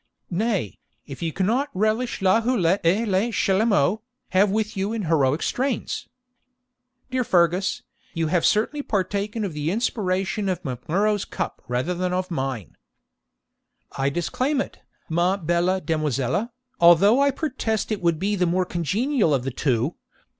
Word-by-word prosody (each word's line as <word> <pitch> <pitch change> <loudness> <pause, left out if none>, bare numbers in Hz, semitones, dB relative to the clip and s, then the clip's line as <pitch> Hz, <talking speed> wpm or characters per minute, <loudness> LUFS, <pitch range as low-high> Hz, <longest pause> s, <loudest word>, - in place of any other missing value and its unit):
'Nay, 190 - -1 0.3
if 135 - -9
you 165 -1 -1
cannot 230 - 0
relish 215 +2 0
la 190 +4 +4
houlette 200 -6 +2
et 195 +8 +2
le 200 +4 +1
chalumeau, 200 -2 +2 0.3
have 195 +2 +3
with 215 +2 -1
you 195 +3 -1
in 225 -2 -2
heroic 155 -3 +2
strains.' 260 0 -2 1.0
'Dear 255 0 +1
Fergus, 180 -1 +1 0.3
you 165 -1 0
have 165 +2 +1
certainly 230 +8 +2
partaken 205 0 -2
of 185 - -4
the 150 +1 -2
inspiration 195 -2 -1
of 180 -2 -3
Mac 125 -1 -6
Murrough's 205 +4 +2
cup - - -5
rather 125 +8 -1
than 180 +1 -2
of 185 0 -2
mine.' 130 - -3 1.2
'I 135 +1 +1
disclaim 255 - -1
it, - - -4 0.3
ma 175 +4 +1
belle 175 +1 +1
demoiselle, 155 - -1 0.3
although 195 +9 +6
I 280 - +4
protest 250 -7 -2
it 210 - -2
would 170 -2 +2
be 200 +5 0
the 180 -2 +1
more 180 +2 +1
congenial 185 - +1
of 130 - -2
the 135 - -3
two. 125 +3 0
185 Hz, 150 wpm, -24 LUFS, 165-215 Hz, 1.2 s, although